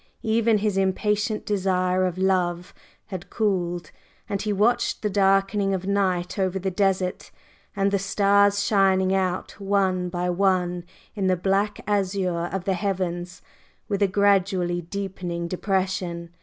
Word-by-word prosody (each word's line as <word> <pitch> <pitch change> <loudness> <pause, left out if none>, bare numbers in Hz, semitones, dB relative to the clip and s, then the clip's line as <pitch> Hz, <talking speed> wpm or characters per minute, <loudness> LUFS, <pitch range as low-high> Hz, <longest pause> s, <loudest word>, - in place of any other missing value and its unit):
Even 225 0 +2
his 205 -1 -1
impatient 210 +3 0
desire 185 -2 +1
of 180 -1 -2
love 180 -2 0 0.4
had 180 0 -6
cooled, 175 -5 -1 0.4
and 200 -1 -2
he 210 - -1
watched 225 +5 +1
the 210 - 0
darkening 195 0 +2
of 185 0 -5
night 190 -2 0
over 190 0 0
the 190 0 -2
desert, 185 -1 0 0.5
and 195 0 +1
the 200 - +1
stars 200 +1 +3
shining 190 -2 +3
out 185 -1 -1
one 190 -2 +1
by 175 0 -2
one 180 -1 +1 0.3
in 195 -3 -1
the 185 -1 +2
black 195 +3 0
azure 190 -4 0
of 190 -2 -3
the 195 - +1
heavens, 180 -2 -3 0.4
with 200 -1 -2
a 200 - +5
gradually 190 -3 +2
deepening 175 -1 -4
depression. 185 -2 -2
190 Hz, 140 wpm, -24 LUFS, 180-200 Hz, 0.5 s, a